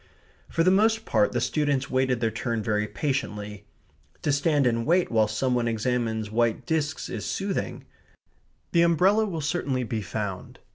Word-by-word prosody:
For 165 Hz, -, +1 dB
the 185 Hz, -, +5 dB
most 220 Hz, +3 st, +3 dB
part 105 Hz, -2 st, +2 dB
the 120 Hz, -, 0 dB
students 140 Hz, +1 st, 0 dB
wait 130 Hz, 0 st, +1 dB
their 115 Hz, -1 st, 0 dB
turn 115 Hz, -1 st, -2 dB
very 105 Hz, -1 st, 0 dB
patiently. 105 Hz, -4 st, -3 dB, 0.6 s
To -, -, +1 dB
stand 145 Hz, 0 st, +2 dB
and 115 Hz, -1 st, +1 dB
wait 175 Hz, +4 st, +2 dB
while 110 Hz, -2 st, +3 dB
some 125 Hz, +4 st, 0 dB
one 120 Hz, -1 st, +1 dB
examines 115 Hz, -1 st, -1 dB
white 115 Hz, +1 st, +1 dB
discs 155 Hz, +1 st, -1 dB
is -, -, -5 dB
soothing. 195 Hz, 0 st, -3 dB, 0.9 s
The 170 Hz, -, +4 dB
umbrella 185 Hz, +6 st, +4 dB
will 165 Hz, -5 st, -4 dB
certainly 145 Hz, -5 st, -1 dB
be 115 Hz, -2 st, -3 dB
found. 100 Hz, -2 st, -5 dB
125 Hz, 160 wpm, -26 LUFS, 110-160 Hz, 0.9 s, the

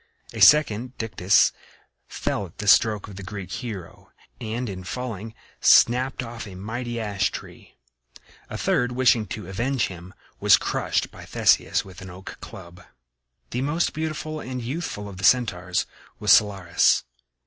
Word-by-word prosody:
A -, -, -6 dB
second, 125 Hz, -4 st, +5 dB
Dictys, 100 Hz, -4 st, +3 dB, 0.6 s
fell 100 Hz, -, -3 dB
at 85 Hz, -, -21 dB
the 105 Hz, -, -5 dB
stroke 105 Hz, 0 st, +4 dB
of 100 Hz, -2 st, -11 dB
the -, -, -7 dB
Greek 95 Hz, -1 st, -7 dB
hero, 105 Hz, -9 st, -7 dB, 0.3 s
and 115 Hz, +3 st, -4 dB
in 95 Hz, -3 st, -6 dB
falling 115 Hz, 0 st, -6 dB, 0.2 s
snapped 125 Hz, +2 st, +4 dB
off 115 Hz, -2 st, -7 dB
a 95 Hz, -, -10 dB
mighty 120 Hz, +5 st, -5 dB
ash 100 Hz, -4 st, 0 dB
tree; -, -, -11 dB, 0.7 s
a -, -, -5 dB
third, 125 Hz, 0 st, 0 dB
wishing 120 Hz, -4 st, +3 dB
to 100 Hz, 0 st, -7 dB
avenge 120 Hz, +7 st, -1 dB
him, 90 Hz, +1 st, -11 dB, 0.2 s
was -, -, +6 dB
crushed -, -, -1 dB
by -, -, -12 dB
Theseus -, -, +2 dB
with 95 Hz, -1 st, -12 dB
an 95 Hz, -, -9 dB
oak 90 Hz, +1 st, -10 dB
club. 90 Hz, -1 st, -11 dB, 0.7 s
The 125 Hz, -, -2 dB
most 150 Hz, +5 st, 0 dB
beautiful 155 Hz, 0 st, -4 dB
and 130 Hz, -3 st, -5 dB
youthful 125 Hz, -4 st, -5 dB
of 100 Hz, -2 st, -10 dB
the 95 Hz, -, -9 dB
Centaurs 95 Hz, -8 st, +2 dB, 0.3 s
was -, -, +2 dB
Cyllarus. 95 Hz, -5 st, +4 dB
110 Hz, 150 wpm, -24 LUFS, 95-125 Hz, 0.7 s, was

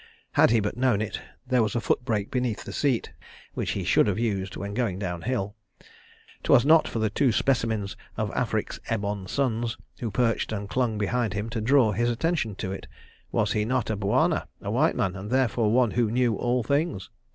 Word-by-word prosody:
Had -, -, +5 dB
he 115 Hz, 0 st, +4 dB
but 105 Hz, -1 st, -2 dB
known 125 Hz, -5 st, +2 dB
it, 105 Hz, -, -3 dB, 0.2 s
there 125 Hz, -1 st, +2 dB
was 110 Hz, 0 st, 0 dB
a -, -, +2 dB
foot 120 Hz, -, 0 dB
brake 110 Hz, -5 st, -1 dB
beneath 125 Hz, -4 st, -1 dB
the -, -, -8 dB
seat, 135 Hz, -5 st, 0 dB, 0.4 s
which -, -, -2 dB
he -, -, -3 dB
should -, -, +4 dB
have 100 Hz, -, 0 dB
used 100 Hz, -4 st, -1 dB
when 100 Hz, 0 st, -5 dB
going 115 Hz, -6 st, -1 dB
down 90 Hz, -3 st, -4 dB
hill. 110 Hz, -4 st, -2 dB, 0.9 s
'Twas 120 Hz, -, +5 dB
not 160 Hz, +2 st, +6 dB
for -, -, -4 dB
the 110 Hz, -2 st, 0 dB
two 130 Hz, +3 st, +2 dB
specimens 110 Hz, -4 st, 0 dB, 0.2 s
of -, -, -1 dB
Afric's -, -, -2 dB
ebon 100 Hz, -3 st, -2 dB
sons, 120 Hz, -2 st, -1 dB, 0.2 s
who 115 Hz, -, -2 dB
perched 115 Hz, +3 st, 0 dB
and 100 Hz, -2 st, -3 dB
clung 120 Hz, -1 st, 0 dB
behind 110 Hz, 0 st, 0 dB
him, 105 Hz, +3 st, -3 dB
to 115 Hz, -2 st, -2 dB
draw 125 Hz, -1 st, +4 dB
his 120 Hz, +4 st, +1 dB
attention 120 Hz, -, -1 dB
to 95 Hz, -, -4 dB
it. 95 Hz, -, -7 dB, 0.4 s
Was 105 Hz, -2 st, +1 dB
he 105 Hz, -, +1 dB
not 120 Hz, 0 st, 0 dB
a -, -, 0 dB
Bwana, 100 Hz, 0 st, +1 dB
a -, -, -4 dB
white -, -, +2 dB
man, 95 Hz, 0 st, 0 dB
and 95 Hz, +2 st, -6 dB
therefore 120 Hz, -4 st, +2 dB
one 120 Hz, -1 st, +3 dB
who 120 Hz, -2 st, +1 dB
knew 120 Hz, 0 st, +2 dB
all 120 Hz, +3 st, 0 dB
things? 140 Hz, -, -1 dB
115 Hz, 205 wpm, -26 LUFS, 105-125 Hz, 0.9 s, not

